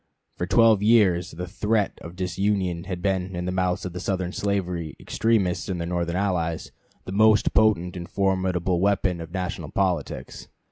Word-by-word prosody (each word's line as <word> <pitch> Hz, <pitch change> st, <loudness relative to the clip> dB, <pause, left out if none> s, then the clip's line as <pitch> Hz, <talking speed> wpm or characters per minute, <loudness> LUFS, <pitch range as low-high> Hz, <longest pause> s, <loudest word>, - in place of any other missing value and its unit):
For 90 Hz, -, -3 dB
twelve 115 Hz, -1 st, +5 dB
years 100 Hz, -5 st, +4 dB
the 90 Hz, +2 st, -6 dB
threat 105 Hz, +2 st, 0 dB
of 85 Hz, +1 st, -9 dB
disunion 90 Hz, -1 st, -1 dB
had 90 Hz, -2 st, -5 dB
been 95 Hz, -2 st, -1 dB
in 90 Hz, 0 st, -3 dB
the 90 Hz, -, -1 dB
mouths 90 Hz, -1 st, 0 dB
of 90 Hz, -, -5 dB
the 90 Hz, -, -5 dB
Southern 90 Hz, -1 st, -2 dB
slavery 90 Hz, -6 st, -2 dB
extremists 105 Hz, -5 st, 0 dB
and 90 Hz, -2 st, -2 dB
their 85 Hz, -, -3 dB
Northern 85 Hz, -1 st, -1 dB
allies 90 Hz, -4 st, -1 dB, 0.3 s
the -, -, -6 dB
most 110 Hz, +2 st, +4 dB
potent 95 Hz, -5 st, +3 dB
and 85 Hz, -1 st, -7 dB
formidable 95 Hz, -2 st, 0 dB
weapon 95 Hz, -3 st, +1 dB
of 80 Hz, -, -7 dB
national 90 Hz, -1 st, -4 dB
politics. 95 Hz, -3 st, -2 dB
90 Hz, 170 wpm, -25 LUFS, 90-100 Hz, 0.3 s, twelve